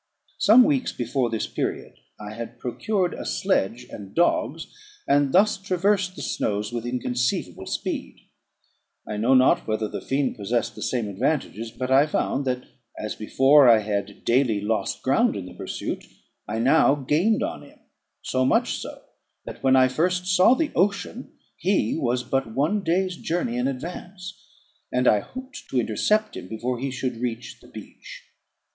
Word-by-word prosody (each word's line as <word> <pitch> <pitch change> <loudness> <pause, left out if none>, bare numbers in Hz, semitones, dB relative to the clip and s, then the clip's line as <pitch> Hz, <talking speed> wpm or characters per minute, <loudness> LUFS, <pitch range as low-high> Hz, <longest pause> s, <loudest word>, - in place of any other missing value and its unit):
Some 250 -3 +7
weeks 270 -2 +1
before 120 +1 -1
this 110 -1 -2
period - - -4 0.3
I 105 0 -7
had 115 +1 -7
procured 180 - -1
a - - -6
sledge 125 - 0
and 100 -2 -10
dogs, 165 -3 +1 0.4
and 140 -1 +3
thus 195 +6 +4
traversed 195 0 0
the - - -7
snows 105 +2 -2
with 120 0 -3
inconceivable 125 0 -2
speed. - - -4 0.9
I 105 - -4
know 120 +5 +3
not 130 0 +4
whether 110 0 -1
the - - -6
fiend 135 0 -1
possessed 110 +3 -1
the - - -11
same 120 -4 -1
advantages; 115 +1 -2
but 130 +3 -5
I 140 +3 +5
found 140 -2 -1
that, 125 -1 -1 0.3
as 105 - -4
before 135 +5 +5
I 115 - +8
had 100 -1 -4
daily 120 -3 +2
lost 105 -1 -2
ground 145 - +2
in 95 - -5
the 90 - -10
pursuit, - - -5 0.4
I 105 +2 -3
now 135 +4 +4
gained 155 - +1
on - - -4
him: - - -16 0.5
so 130 0 0
much - - +2
so, - - -9 0.4
that - - -9
when 130 -1 +4
I 130 -1 +6
first 180 +7 0
saw 185 +6 +5
the 310 +1 -1
ocean, 200 +6 -1 0.2
he 190 +2 +1
was 125 -5 0
but 125 -3 -2
one 165 +10 +1
day's 185 +2 0
journey 165 -8 -2
in 125 +1 0
advance, 180 +6 -6 0.6
and 125 0 +1
I 105 - +5
hoped 260 - -10
to 130 - +1
intercept 210 - +1
him - - -8
before 120 +2 -3
he 135 +2 -2
should 130 -2 -3
reach 120 -1 -4
the - - -17
beach. - - -11
130 Hz, 165 wpm, -24 LUFS, 115-180 Hz, 0.9 s, I